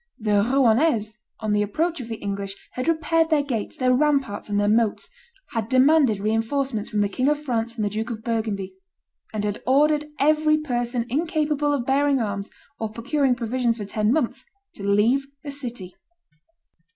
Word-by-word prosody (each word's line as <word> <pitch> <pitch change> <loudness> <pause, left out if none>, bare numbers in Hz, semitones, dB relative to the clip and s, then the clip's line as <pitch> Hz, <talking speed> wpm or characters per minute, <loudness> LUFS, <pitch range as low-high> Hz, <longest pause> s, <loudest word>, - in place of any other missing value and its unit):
The 210 -2 +2
Rouennese, 235 -2 +2 0.2
on 215 -1 0
the 210 - +2
approach 320 - -1
of 235 - -8
the 225 - -4
English, 200 -1 -4 0.2
had 255 - -4
repaired 325 0 +2
their 305 -3 +3
gates, 240 -7 -3
their 255 -1 +3
ramparts, 270 -7 +1
and 205 0 +1
their 205 - +2
moats; 220 0 +1 0.4
had 225 -1 -3
demanded 260 -4 +4
re 210 +2 0
enforcements 225 0 -1
from 210 - 0
the 205 - +2
King 255 +7 -1
of 295 0 +1
France 235 -4 -2
and 215 -3 -1
the - - 0
Duke 220 +3 -3
of 220 -2 -6
Burgundy; 220 -4 -2 0.6
and 215 -2 -3
had 205 -1 -2
ordered 300 +3 +3
every 305 +1 +3
person 245 -5 -2
incapable 300 +1 0
of 275 -4 -1
bearing 275 +1 +2
arms 200 -3 -3 0.3
or 220 - -2
procuring 260 +4 0
provisions 240 -1 -1
for 210 - -5
ten 210 +2 0
months, 260 -2 0 0.3
to - - -12
leave 220 +7 +2 0.2
the 285 - -5
city. 240 -10 -6
240 Hz, 175 wpm, -24 LUFS, 215-285 Hz, 0.6 s, demanded